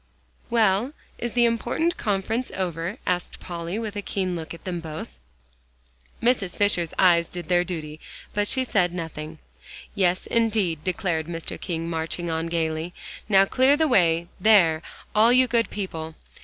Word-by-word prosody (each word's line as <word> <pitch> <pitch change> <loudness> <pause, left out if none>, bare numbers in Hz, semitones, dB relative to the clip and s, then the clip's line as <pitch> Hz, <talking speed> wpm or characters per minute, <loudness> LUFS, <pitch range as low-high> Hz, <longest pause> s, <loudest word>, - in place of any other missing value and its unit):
"Well, 225 +2 +2 0.3
is 240 -1 -3
the 240 -1 +4
important 240 +9 0
conference 215 +4 -1
over?" 180 +2 -3
asked 180 -1 -2
Polly, 170 +2 -5
with 220 -2 -4
a 205 - -2
keen 185 -2 -2
look 160 -2 -6
at 170 - -9
them 180 -2 -3
both. 155 - -7 1.0
Mrs. 230 -7 +1
Fisher's 180 -5 +1
eyes 170 -3 +5
did 175 -3 -8
their 175 -1 +4
duty, 155 -4 -6 0.3
but 205 0 +1
she 260 - +1
said 180 -8 +1
nothing. 160 -2 -6 0.6
"Yes, 185 -3 +1
indeed," 210 -9 +1
declared 180 -5 -1
Mr. 165 -1 -6
King, 165 -1 -3
marching 165 +1 -2
on 160 +1 -1
gaily. 165 0 -2 0.3
"Now 195 -1 +6
clear 260 +7 +3
the 315 0 +3
way 170 - +3
there, 180 -6 +5 0.3
all 220 +2 +6
you 255 +1 +6
good 230 -1 +1
people. 160 -6 -5
180 Hz, 155 wpm, -25 LUFS, 165-215 Hz, 1.0 s, Now